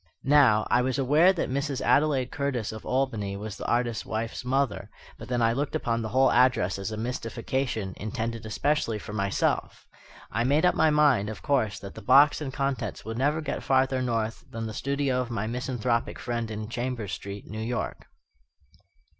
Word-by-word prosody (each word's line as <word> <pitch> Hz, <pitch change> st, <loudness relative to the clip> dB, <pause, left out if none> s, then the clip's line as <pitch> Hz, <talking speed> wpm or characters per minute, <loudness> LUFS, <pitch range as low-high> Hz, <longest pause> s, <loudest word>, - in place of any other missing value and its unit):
Now, 135 Hz, -7 st, +5 dB
I 120 Hz, -, +5 dB
was 130 Hz, +1 st, 0 dB
aware 150 Hz, +7 st, +5 dB
that 185 Hz, -, -2 dB
Mrs. 140 Hz, 0 st, -1 dB
Adelaide 140 Hz, -4 st, +2 dB
Curtis 135 Hz, -6 st, -2 dB
of 110 Hz, 0 st, -9 dB
Albany 115 Hz, -7 st, -1 dB
was 105 Hz, 0 st, -6 dB
the -, -, -6 dB
artist's 120 Hz, -2 st, 0 dB
wife's 110 Hz, +2 st, -4 dB
mother; 135 Hz, +1 st, 0 dB, 0.3 s
but -, -, -9 dB
then 120 Hz, -1 st, 0 dB
I 115 Hz, 0 st, +3 dB
looked 140 Hz, +3 st, -2 dB
upon 115 Hz, -1 st, 0 dB
the 110 Hz, -, -3 dB
whole 130 Hz, +4 st, +4 dB
address 125 Hz, -7 st, +3 dB
as 100 Hz, +3 st, -4 dB
a 110 Hz, -, -4 dB
mystification, 115 Hz, -2 st, -3 dB
intended 110 Hz, +2 st, -4 dB
especially 115 Hz, +1 st, 0 dB
for 105 Hz, -, -8 dB
myself. 100 Hz, -2 st, -1 dB, 0.5 s
I 115 Hz, -, 0 dB
made 145 Hz, +7 st, +3 dB
up 180 Hz, -, +4 dB
my 160 Hz, -, +3 dB
mind, 145 Hz, -9 st, +3 dB
of 110 Hz, -, -8 dB
course, 130 Hz, -8 st, +1 dB
that 100 Hz, -, -9 dB
the -, -, -10 dB
box 140 Hz, +4 st, +5 dB
and 140 Hz, -3 st, -3 dB
contents 135 Hz, -8 st, -3 dB
would 110 Hz, +1 st, -4 dB
never 150 Hz, +4 st, +1 dB
get 150 Hz, -, -3 dB
farther 130 Hz, -1 st, +2 dB
north 115 Hz, -3 st, -2 dB
than 115 Hz, 0 st, -5 dB
the 110 Hz, -, -5 dB
studio 140 Hz, +1 st, 0 dB
of 125 Hz, -, -5 dB
my 115 Hz, -3 st, -2 dB
misanthropic 120 Hz, 0 st, -1 dB
friend 120 Hz, -2 st, -3 dB
in 110 Hz, 0 st, -5 dB
Chambers 120 Hz, -3 st, -3 dB
Street, 100 Hz, 0 st, -7 dB
New 110 Hz, +1 st, -6 dB
York. 120 Hz, +2 st, -4 dB
120 Hz, 185 wpm, -27 LUFS, 110-135 Hz, 0.5 s, Now